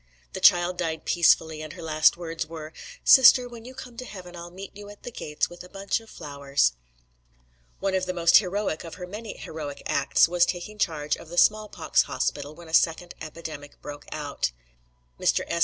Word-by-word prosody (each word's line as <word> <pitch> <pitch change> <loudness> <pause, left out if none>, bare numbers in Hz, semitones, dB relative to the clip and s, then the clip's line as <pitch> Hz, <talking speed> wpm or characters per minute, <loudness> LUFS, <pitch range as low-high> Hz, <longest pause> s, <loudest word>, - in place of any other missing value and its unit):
The - - -4
child 175 +1 +5
died 160 -2 -2
peacefully, 160 -2 +3
and 155 0 -7
her - - -10
last 155 +1 +4
words 165 -1 -4
were: 160 -1 -8 0.3
"Sister, 255 -1 +8
when 235 -2 -11
you 255 +1 -10
come 245 -2 -10
to 255 - -6
heaven, 180 -6 -10
I'll 170 0 -8
meet 190 +3 -10
you 205 0 -10
at 205 - -14
the 245 - -7
gates 150 -8 -2
with 175 0 -11
a 180 - -13
bunch 195 +2 -2
of 225 -1 -17
flowers." 140 - 0 1.1
One 195 0 -1
of 185 -1 0
the 185 - -1
most 170 -1 +6
heroic 195 -3 -1
of 165 - -8
her 180 - -7
many 210 +4 -8
heroic 150 -3 -7
acts 140 - +3
was 175 0 +3
taking 190 +4 -2
charge 150 -6 0
of 160 - -13
the 175 - -8
small 215 +3 +4
pox - - +2
hospital 145 +3 -3
when 170 0 -13
a 160 - -12
second 165 +1 +2
epidemic 155 -2 -8
broke 145 0 -9
out. 145 - -2 0.7
Mr. - - +2
S. 170 - -1
175 Hz, 200 wpm, -26 LUFS, 155-195 Hz, 1.1 s, Sister